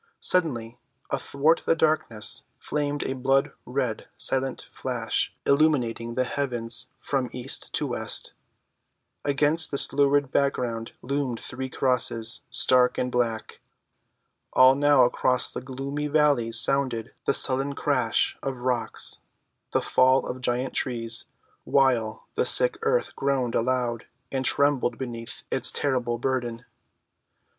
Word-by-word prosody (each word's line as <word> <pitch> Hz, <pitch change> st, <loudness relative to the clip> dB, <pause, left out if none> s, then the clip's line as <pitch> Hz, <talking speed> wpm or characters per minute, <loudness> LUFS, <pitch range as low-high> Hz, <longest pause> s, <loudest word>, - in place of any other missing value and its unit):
Suddenly 120 Hz, -10 st, 0 dB, 0.3 s
athwart 150 Hz, +4 st, +1 dB
the -, -, +4 dB
darkness 155 Hz, -9 st, 0 dB
flamed 145 Hz, -1 st, -2 dB
a -, -, -2 dB
blood‐red, 130 Hz, -2 st, -1 dB
silent 135 Hz, -1 st, -2 dB
flash -, -, -2 dB
illumining 125 Hz, -6 st, +1 dB
the 130 Hz, -, +2 dB
heavens 120 Hz, -3 st, -1 dB
from 135 Hz, -3 st, -2 dB
east 125 Hz, +2 st, -2 dB
to 150 Hz, -, +1 dB
west. 110 Hz, -5 st, -3 dB, 0.9 s
Against 145 Hz, +3 st, +2 dB
this 140 Hz, -, +3 dB
lurid 140 Hz, -1 st, +2 dB
background 120 Hz, -5 st, -1 dB
loomed 135 Hz, -3 st, -2 dB
three 130 Hz, +1 st, -6 dB
crosses, 120 Hz, -3 st, 0 dB
stark 125 Hz, -1 st, +3 dB
and 125 Hz, -, -1 dB
black. 115 Hz, -3 st, -2 dB, 1.0 s
And 130 Hz, +2 st, +6 dB
now 145 Hz, -3 st, +5 dB
across 125 Hz, +1 st, +1 dB
the -, -, -6 dB
gloomy 140 Hz, +3 st, -4 dB
valleys 140 Hz, -7 st, +2 dB
sounded 125 Hz, -3 st, +2 dB
the -, -, +2 dB
sullen 135 Hz, +2 st, +4 dB
crash -, -, 0 dB
of 135 Hz, -2 st, -4 dB
rocks, 125 Hz, -3 st, -1 dB, 0.5 s
the -, -, 0 dB
fall 130 Hz, +1 st, +3 dB
of 130 Hz, 0 st, -6 dB
giant 125 Hz, +1 st, -1 dB
trees, 115 Hz, -2 st, 0 dB, 0.4 s
while 120 Hz, -5 st, +1 dB
the 465 Hz, -, 0 dB
sick -, -, +4 dB
earth 475 Hz, +2 st, 0 dB
groaned 135 Hz, -4 st, -1 dB
aloud 120 Hz, -1 st, -1 dB, 0.2 s
and 130 Hz, -1 st, -1 dB
trembled 135 Hz, -4 st, +2 dB
beneath 115 Hz, -3 st, -7 dB
its -, -, +4 dB
terrible 125 Hz, -4 st, -1 dB
burden. 120 Hz, -1 st, -3 dB
130 Hz, 120 wpm, -25 LUFS, 120-140 Hz, 1.0 s, And